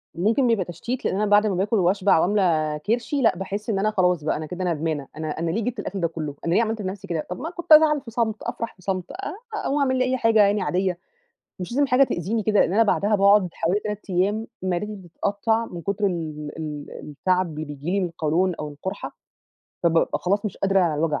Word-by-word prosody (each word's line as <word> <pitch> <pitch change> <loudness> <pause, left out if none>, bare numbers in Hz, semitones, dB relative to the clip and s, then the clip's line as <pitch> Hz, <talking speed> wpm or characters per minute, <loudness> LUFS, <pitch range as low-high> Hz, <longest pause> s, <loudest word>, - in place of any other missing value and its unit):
ممكن 220 +9 +2
بيبقى 220 -6 +2
تشتيت 235 +9 -5
لإن - - +1
أنا 210 - +1
بعد 205 +1 +4
ما 195 - 0
باكل 200 +5 0
وأشبع 185 0 +3
وأملى 160 -6 +1
كرشي، 240 +6 0
لأ 225 -7 +3
باحس 200 +3 -5
إن 195 -3 +1
أنا 215 +2 +1
خلاص 180 -6 +2
بقى 155 - 0
أنا 155 - -5
كده 180 +4 -5
ندمانة، 155 -4 -2
أنا 155 0 -4
أنا 165 0 -1
ليه 220 +5 -1
جِبت 240 -1 -3
الأكل 195 -1 -4
ده 170 - +2
كلّه، 155 -3 -5
أنا 170 - +1
ليه 225 - +4
عملت 220 -1 -1
في 190 - -3
نَفْسي 195 +1 -6
كده؟ 165 -3 -3
طَب 180 - -5
ما 320 +5 -4
كنت 345 -2 -9
أزعل 305 -2 +7
في 230 - -11
صمت، 225 -2 0
أفرح 235 -1 -4
في 185 - -22
صمت 185 -1 -3
آآ 390 0 -5 0.2
أقوم 295 -8 -1
أعمل 260 -2 +2
لي 255 - +3
أي 260 0 0
حاجة 225 -2 +3
يعني 205 0 +3
عاديّة. 185 0 0 0.6
مش 180 +5 -6
لازم 285 +3 +2
حاجة 255 +1 +4
تأذيني 215 +2 -2
كده 210 0 +3
لإن 175 - +2
أنا 225 - +5
بعدها 210 0 +2
باقعُد 200 -1 +5
حوالي 180 +5 0
3 210 -1 -6
أيّام 205 +5 +1 0.2
معدتي 190 +3 -2
بتتقطّع 205 +5 -1
من 170 -5 -8
كتر 200 +1 0
ال 155 -4 -4
ال 150 -2 -5 0.2
التَعَب 180 +2 0
اللي 155 - -3
بييجي 145 +3 -6
لي 200 - +1
من 185 - 0
القولون 170 +2 0
أو 150 -1 -5
القُرحة، 190 +7 -6 0.7
فبابقى 165 -1 +2
خلاص 200 +4 0
مش 210 - -3
قادرة 195 -1 +2
على 170 -4 +2
الوجع، 150 0 0
195 Hz, 230 wpm, -24 LUFS, 170-220 Hz, 0.7 s, أزعل